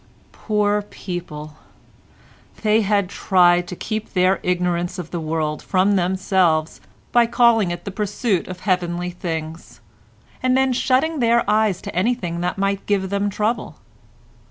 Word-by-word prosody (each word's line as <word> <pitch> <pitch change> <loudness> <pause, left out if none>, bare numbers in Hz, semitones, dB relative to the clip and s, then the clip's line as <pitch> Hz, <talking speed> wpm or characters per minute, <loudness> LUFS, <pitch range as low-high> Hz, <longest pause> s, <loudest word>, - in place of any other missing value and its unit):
Poor 210 -1 0
people! 160 -6 -7 1.1
They 215 +1 +4
had 200 -2 +1
tried 175 -2 +3
to 180 - -6
keep 215 +3 -5
their 185 +1 +3
ignorance 180 0 -1
of 175 -3 -7
the 175 - -3
world 155 -1 -2
from 195 +2 +2
themselves 185 -3 +1 0.3
by 240 -1 +4
calling 235 -5 +3
it 175 - -5
the 200 - -4
pursuit 205 -1 -1
of 180 -1 -8
heavenly 180 -2 -1
things, 165 -2 -6 0.6
and 255 0 +2
then 265 -1 +2
shutting 275 +5 +1
their 235 -2 +2
eyes 210 -3 +1
to - - -7
anything 180 -4 -1
that 180 +2 -2
might 195 0 -1
give 195 -2 0
them 200 0 0
trouble. 215 +4 -2
190 Hz, 140 wpm, -21 LUFS, 175-215 Hz, 1.1 s, They